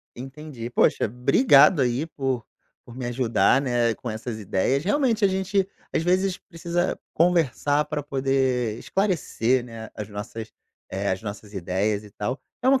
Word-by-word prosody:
Entendi. 135 -1 -7
Poxa, - - +3
obrigado, 140 - +5
aí, 125 +5 +1
por 135 -6 -2 0.4
por 120 +1 -12
me 125 -2 -4
ajudar, 125 +2 +2
né, 120 -3 +1
com 120 - -6
essas 110 +1 -5
ideias. 110 +8 0
Realmente, 225 - +2
a - - +6
gente 190 0 0 0.3
às - - +2
vezes 185 +2 +2
precisa 170 0 -2 0.2
conversar 150 -3 +2
pra 150 -1 -3
poder 130 -4 0
esclarecer, 140 - 0
né, 115 -2 -8
as 105 -1 -6
nossas 105 +2 -7 0.4
eh, 100 +1 -2
as 95 - -4
nossas 105 0 -7
ideias, 100 +3 -1
e 105 - -13
tal. 120 +7 -4 0.2
É 255 - +1
uma 270 -1 +5
130 Hz, 155 wpm, -25 LUFS, 115-165 Hz, 0.4 s, a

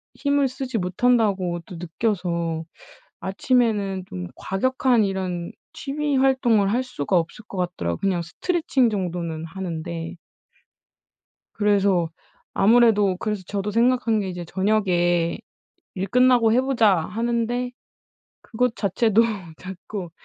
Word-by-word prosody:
힘을 285 -1 +1
쓰지 255 -2 -4
못한다고 190 -2 +1
또 180 - -9
느껴서 170 -2 -2 0.6
아침에는 200 -1 0
좀 90 -1 -6
과격한 250 +3 +1
이런 185 -3 -3 0.2
취미 290 0 -2
활동을 245 -7 +3
할 245 +3 +1
수가 190 - -2
없을 170 +6 -5
것 195 - -9
같더라고요. 170 - -2
그냥 185 -3 0
스트레칭 265 - 0
정도는 170 -5 -3
하는데. 165 -2 -5 1.4
그래서 200 -5 +2 0.4
아무래도 210 -3 +4
그래서 210 -1 -3
저도 205 0 -2
생각한 235 -1 +2
게 195 -2 -3
이제 175 -1 -5
저녁에 175 -3 +1 0.6
'일 190 +1 -2
끝나고 245 0 +4
해 250 - +4
보자.' 235 -7 +3
하는데 235 +6 -1 0.7
그것 245 +1 -1
자체도 220 +1 +2 0.4
자꾸 185 0 -7
200 Hz, 260 characters per minute, -23 LUFS, 180-240 Hz, 1.4 s, 아무래도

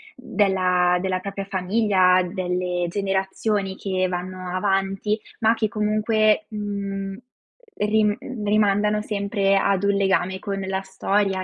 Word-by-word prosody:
della 185 -6 +2
della 185 0 -1
propria 195 +1 -5
famiglia, 190 -1 +3
delle 180 -1 -2
generazioni 195 +1 -1
che 185 -2 -1
vanno 185 0 -5
avanti, 195 +2 0 0.2
ma 225 -1 +4
che 225 -1 0
comunque 215 +3 +2
,mhmm, 200 -2 -4 0.6
ri 210 0 +2 0.3
rimandano 210 0 +2
sempre 200 -1 0
ad 195 0 +1
un 200 0 +3
legame 190 -1 +1
con 195 0 -4
la 190 0 -2
storia 195 0 0
195 Hz, 115 wpm, -23 LUFS, 185-210 Hz, 0.6 s, ma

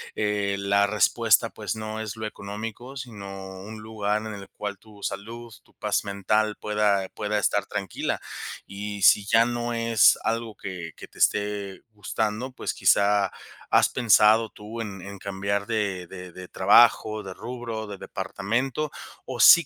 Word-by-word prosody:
eh, 105 -1 0
la 100 +1 +3
respuesta, 110 +2 +3
pues 105 -3 -4
no 110 0 -5
es 110 -1 -4
lo 110 -1 -5
económico, 110 +6 -7
sino 100 -6 -8
un 110 +2 -9
lugar 105 -1 -1
en 110 - -5
el 100 -1 -8
cual 100 -2 -5
tu 105 0 -17
salud, 115 +2 -5
tu - - -27
paz 105 -1 -1
mental 105 +2 +1
pueda 105 -2 +1
pueda 105 0 -1
estar 105 -1 +1
tranquila 100 -2 -3 0.4
y 100 +1 -6
si 100 +1 +6
ya 115 +3 +5
no 120 0 -2
es 115 -2 +5
algo 115 -1 -2
que 90 -5 -6
que - - -11
te - - -20
esté 105 0 +2 0.3
gustando, 110 +4 -2
pues, 130 - -3
quizá, 100 0 +3 0.4
¿has - - +5
pensado 110 -1 +5
tú 105 +3 -9
en 100 -4 -6
en 100 +2 -8
cambiar 100 +1 -2
de 100 -5 -1
de 90 0 -9
de 90 +1 -10
trabajo, 110 +2 +5
de 95 -1 -7
rubro, 115 -1 -5
de 100 -1 -7
departamento 125 +12 -2 0.3
o 130 -2 -6
sí 170 +7 +9
105 Hz, 160 wpm, -26 LUFS, 100-110 Hz, 0.4 s, sí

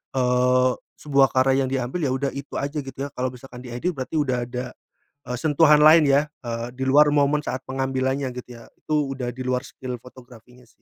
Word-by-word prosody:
eee, 125 0 +3 0.3
sebuah 140 -4 +3
karya 135 +1 +3
yang 130 - -2
diambil 130 +5 -2
ya - - -1
udah 135 0 -2
itu 140 - -7
aja 140 +2 -2
gitu 135 -2 -8
ya, - - -12
kalau 125 +1 -1
misalkan 125 0 -12
diedit 125 +8 -3
berarti 130 +3 -5
udah 130 -4 0
ada, 125 +1 -5 0.6
eee, 125 0 -4
sentuhan 150 +1 +4
lain 155 +1 +7
ya, 140 +2 +3 0.2
eee, 115 0 -3
di 130 - -4
luar 150 +2 +6
momen 145 0 +3
saat 130 0 -4
pengambilannya 130 +1 -1
gitu 125 - -8
ya, - - -15
itu 155 - -3 0.2
udah 125 -2 -4
di 130 - -8
luar 125 0 0
skill 125 -1 -7
fotografinya 125 0 -16
sih. - - -26
130 Hz, 200 wpm, -23 LUFS, 125-140 Hz, 0.6 s, lain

